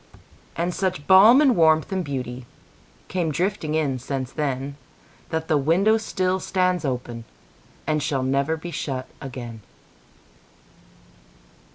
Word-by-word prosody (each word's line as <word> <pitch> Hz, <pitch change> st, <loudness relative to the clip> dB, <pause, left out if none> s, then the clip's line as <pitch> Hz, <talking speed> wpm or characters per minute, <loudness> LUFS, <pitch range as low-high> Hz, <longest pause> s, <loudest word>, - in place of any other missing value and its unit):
And 175 Hz, +2 st, -1 dB
such 185 Hz, -6 st, -2 dB
balm 210 Hz, +8 st, +8 dB
and 270 Hz, -5 st, +4 dB
warmth 160 Hz, 0 st, +3 dB
and 190 Hz, -1 st, -1 dB
beautyCame 130 Hz, -, -6 dB
drifting 165 Hz, -1 st, -1 dB
in 140 Hz, -5 st, 0 dB
since 130 Hz, 0 st, -4 dB
then, 140 Hz, -2 st, -3 dB, 0.5 s
That 160 Hz, 0 st, -2 dB
the 150 Hz, -, +2 dB
window 185 Hz, +10 st, +3 dB
still 185 Hz, -3 st, -1 dB
stands 185 Hz, -2 st, 0 dB
openAnd 120 Hz, -4 st, -4 dB, 0.8 s
shall 140 Hz, -3 st, -1 dB
never 140 Hz, +4 st, 0 dB
be 175 Hz, +2 st, -7 dB
shut 135 Hz, -4 st, -4 dB
again. 120 Hz, -4 st, -7 dB
155 Hz, 110 wpm, -23 LUFS, 130-185 Hz, 0.8 s, balm